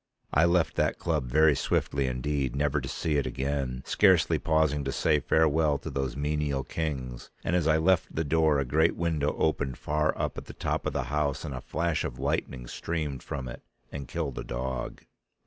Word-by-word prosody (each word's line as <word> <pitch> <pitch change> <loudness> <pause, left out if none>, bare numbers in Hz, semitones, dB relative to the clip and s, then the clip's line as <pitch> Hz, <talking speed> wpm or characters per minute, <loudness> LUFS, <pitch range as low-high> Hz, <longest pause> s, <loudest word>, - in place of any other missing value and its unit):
I 80 - +5
left 85 -1 +2
that - - +1
club 65 - -1
very 75 +3 +5
swiftly 70 +1 0
indeed, 65 0 -1
never 75 0 +1
to 65 - -5
see 75 -2 -1
it 70 - 0
again, 65 -2 -2
scarcely - - +4
pausing 80 -2 +2
to 70 - -1
say 75 +2 +2
farewell 80 +1 +3
to - - -7
those 65 -3 -2
menial 75 -2 -1
kings, 65 -6 -4
and 85 - 0
as 85 -3 +2
I 80 0 +4
left 80 +1 +2
the 80 - +1
door 80 0 +3
a 70 - 0
great 80 +6 +2
window 80 -4 0
opened 70 -5 0
far 75 +1 0
up - - -2
at - - -12
the - - -10
top - - -2
of - - -2
the - - 0
house 75 0 0
and 70 - -4
a 65 - -5
flash 85 +3 -1
of 60 - -4
lightning 65 -2 -2
streamed 75 0 -3
from 65 - -5
it - - -8 0.3
and 70 -2 -6
killed 75 -5 -3
a - - -4
dog. 65 +1 -4
75 Hz, 200 wpm, -28 LUFS, 65-80 Hz, 0.3 s, I